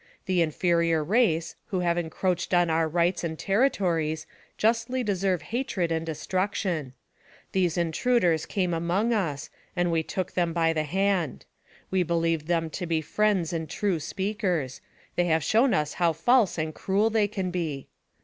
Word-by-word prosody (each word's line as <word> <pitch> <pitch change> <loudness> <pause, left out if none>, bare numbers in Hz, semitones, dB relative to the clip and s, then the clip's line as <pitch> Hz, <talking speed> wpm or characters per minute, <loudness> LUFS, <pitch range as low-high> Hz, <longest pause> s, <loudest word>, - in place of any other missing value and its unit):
The 185 -2 +2
inferior 165 0 +2
race, 170 -4 +1
who 185 -2 -1
have 170 -1 +1
encroached 175 +1 -1
on 175 -1 +3
our 160 0 +2
rights 175 +2 +1
and 160 -1 -3
terri 225 - +2
tories, 160 -7 -1 0.3
justly 235 +3 +1
deserve 190 -4 0
hatred 230 -8 -2
and 160 0 0
destruction. 165 -2 -2 0.6
These 180 -3 +1
intruders 170 0 +1
came 180 -4 0
among 175 +8 +1
us, 155 -10 -2 0.2
and 175 -1 +1
we 165 -1 +2
took 185 +3 -4
them 170 -2 0
by 165 -1 +2
the 155 -1 -1
hand. 190 -3 0 0.5
We 190 -1 +2
believed 165 -2 0
them 165 -2 0
to 180 +2 -4
be 160 -1 +1
friends 190 -1 +1
and 160 -2 -3
true 195 -3 0
speakers; 185 - -2 0.3
they 175 - +2
have 160 -2 +2
shown 235 - +3
us 150 -7 0
how 170 -2 +2
false 220 - +3
and 155 -1 -2
cruel 205 +6 +1
they 215 -2 +3
can 190 -3 -3
be. 160 -6 -3
175 Hz, 160 wpm, -26 LUFS, 160-195 Hz, 0.6 s, on